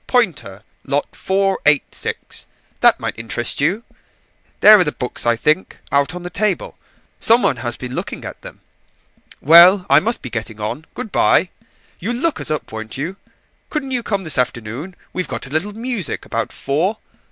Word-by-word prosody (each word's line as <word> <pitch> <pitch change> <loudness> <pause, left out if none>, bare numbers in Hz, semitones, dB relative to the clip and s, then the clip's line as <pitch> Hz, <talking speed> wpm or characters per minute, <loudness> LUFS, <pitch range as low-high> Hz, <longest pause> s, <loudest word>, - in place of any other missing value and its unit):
Poynter. 120 - 0 0.2
Lot 145 +1 -2
486. 190 -7 -1 0.3
That - - +5
might - - -4
interest 115 +2 0
you. 185 +10 +1 0.8
There 215 0 +9
are - - +5
the 150 - -1
books, 125 -1 -3
I 120 - +4
think: 150 +10 0
out 140 +4 +2
on 180 - -7
the 180 - -6
table. 210 -4 -1 0.4
Some 230 +2 +4
one 130 - +2
has 120 0 -2
been 125 -1 -7
looking - - -5
at - - -8
them. - - -12 0.8
Well, 175 +5 +8
I 140 - +8
must 230 +8 -1
be 125 - -7
getting 110 -1 -5
on. 110 +9 -4
Good 215 - -6
bye, 180 - +3 0.5
you'll 230 +7 -2
look 300 +5 -1
us - - -3
up, 155 -1 -3
won't 110 +1 -7
you? 165 +8 -4 0.5
Couldn't 285 -4 -3
you 250 -2 0
come 200 -3 -2
this 155 -6 +1
afternoon? 125 - -3 0.2
we've 185 - -2
got - - -5
a 130 - -10
little 170 +7 -1
music 225 - -3
about - - -3
four. 165 +10 -1
160 Hz, 175 wpm, -19 LUFS, 130-200 Hz, 0.8 s, There